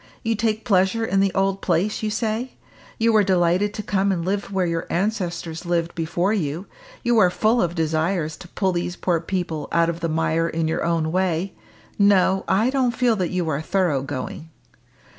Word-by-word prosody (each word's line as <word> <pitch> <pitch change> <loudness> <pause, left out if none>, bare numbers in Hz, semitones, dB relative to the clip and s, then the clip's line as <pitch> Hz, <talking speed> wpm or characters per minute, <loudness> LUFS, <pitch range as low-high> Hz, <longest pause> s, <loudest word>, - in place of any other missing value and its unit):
You 230 - +1
take 220 +1 -1
pleasure 200 +1 +2
in 195 -2 +1
the 195 0 +3
old 195 0 +1
place, 185 +4 0
you 215 - -1
say; 225 +3 -2 0.4
you 230 0 +2
were 215 -1 +5
delighted 185 +2 +2
to 210 - -4
come 200 -1 +1
and 170 -3 -2
live 195 +1 -2
where 190 -2 +1
your 165 -1 -2
ancestors 175 -4 -2
lived 170 -1 -1
before 175 +4 0
you; 170 -2 -2 0.4
you 240 -1 +3
are 185 -4 +6
full 220 +6 +2
of 175 -1 -1
desires 160 0 0
to - - -11
pull 190 +2 -1
these 175 0 -2
poor 175 -2 0
people 165 -3 -3
out 170 0 +3
of 170 - -8
the 165 -1 -2
mire 165 +1 +1
in 165 0 -1
your 160 - -1
own 165 -2 0
way. 185 0 0 0.5
No! 195 -1 +4
I 220 +6 +2
don't 255 -3 +1
feel 245 -3 +3
that 180 -3 -1
you 180 -2 -1
are 145 -1 -1
thorough 175 -5 +1
going!" 135 +4 -6
185 Hz, 195 wpm, -22 LUFS, 165-205 Hz, 0.5 s, are